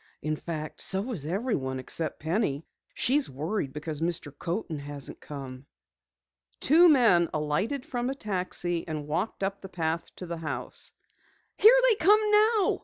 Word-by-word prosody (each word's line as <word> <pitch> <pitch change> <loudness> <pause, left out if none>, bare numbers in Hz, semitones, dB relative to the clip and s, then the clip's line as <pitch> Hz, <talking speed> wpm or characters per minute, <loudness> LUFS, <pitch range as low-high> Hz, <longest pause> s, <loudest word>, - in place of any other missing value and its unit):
"In 155 0 0
fact, 155 -1 -6
so 195 +6 0
is 150 -8 -4
everyone 170 - -1
except 155 +4 -4
Penny. 160 -3 -1 0.3
She's 280 +3 +1
worried 150 +3 -3
because 150 +1 -5
Mr. 165 -4 -2
Coaten 170 -1 -3
hasn't 145 -1 -6
come." 135 -2 -8 0.9
Two 335 +5 +6
men 225 - +5
alighted 155 - -1
from 245 0 -2
a 270 - -3
taxi 180 -6 -2
and 155 -2 -4
walked 180 +7 -2
up 195 +1 -2
the 195 - -9
path 165 -1 -2
to 185 - -7
the 170 -1 -5
house. 160 -1 -4 0.6
"Here 450 +5 +7
they 440 -7 +4
come 415 +5 +7
now!" 425 0 +4
170 Hz, 150 wpm, -28 LUFS, 150-235 Hz, 0.9 s, Here